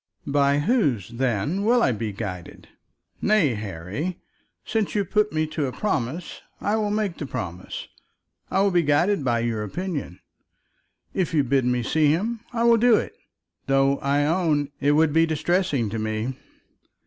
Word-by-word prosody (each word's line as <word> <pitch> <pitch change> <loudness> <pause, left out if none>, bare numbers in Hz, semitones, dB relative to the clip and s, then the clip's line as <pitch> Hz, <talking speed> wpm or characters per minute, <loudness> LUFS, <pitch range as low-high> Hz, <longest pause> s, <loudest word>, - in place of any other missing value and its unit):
"By 140 0 +2
whose, 145 - +1
then, 125 - -1
will 235 +2 +4
I - - +3
be 110 -1 -3
guided? 95 -4 -7 0.5
Nay, 200 - +3
Harry, 105 - -5 0.5
since 220 -2 -1
you 205 -1 +1
put 210 +3 +1
me 155 0 0
to 150 -3 -1
a - - -3
promise, 160 - -3 0.2
I 205 - 0
will 210 -1 0
make 205 -4 -1
the 145 - -4
promise. 95 -9 -6 0.6
I 190 - +2
will 200 0 +3
be 175 -1 +3
guided 160 +4 +2
by 120 -2 +1
your 115 -2 -1
opinion. 145 - -4 0.9
If 185 -3 -1
you 145 - +4
bid 135 0 +1
me 125 -1 +1
see 155 +5 +2
him, 210 +10 0
I 235 -2 -1
will 235 0 +6
do 235 0 +5
it, - - -2 0.5
though, 135 0 +3
I 140 +1 +1
own, 155 -3 +1
it 145 +1 +3
would 155 0 +3
be 165 +1 +4
distressing 160 - 0
to 115 - -3
me." 110 +3 -2
145 Hz, 165 wpm, -24 LUFS, 120-190 Hz, 0.9 s, will